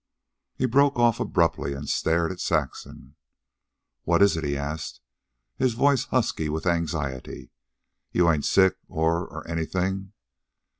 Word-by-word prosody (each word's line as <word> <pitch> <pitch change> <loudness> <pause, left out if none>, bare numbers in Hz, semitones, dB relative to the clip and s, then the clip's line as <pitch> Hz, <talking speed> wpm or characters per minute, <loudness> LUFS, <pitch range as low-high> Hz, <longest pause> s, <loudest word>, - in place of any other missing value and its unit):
He 130 - 0
broke 140 +2 +3
off 120 -1 +3
abruptly 85 - 0
and 70 +1 -7
stared 85 +4 +1
at 90 - -8
Saxon. 65 - -3 0.9
"What 85 +3 +3
is 100 - +4
it?" 80 - -3
he 70 -1 -1
asked, 75 +2 -5 0.6
his 130 -3 +1
voice 135 +1 +3
husky 110 - 0
with 80 +3 -3
anxiety. 80 -6 -2 0.6
"You 90 -1 +3
ain't 75 -3 -1
sick... 95 -1 +4
or... 80 +2 0
or 80 -1 -9
anything?" 95 +4 -2
85 Hz, 135 wpm, -25 LUFS, 80-105 Hz, 0.9 s, is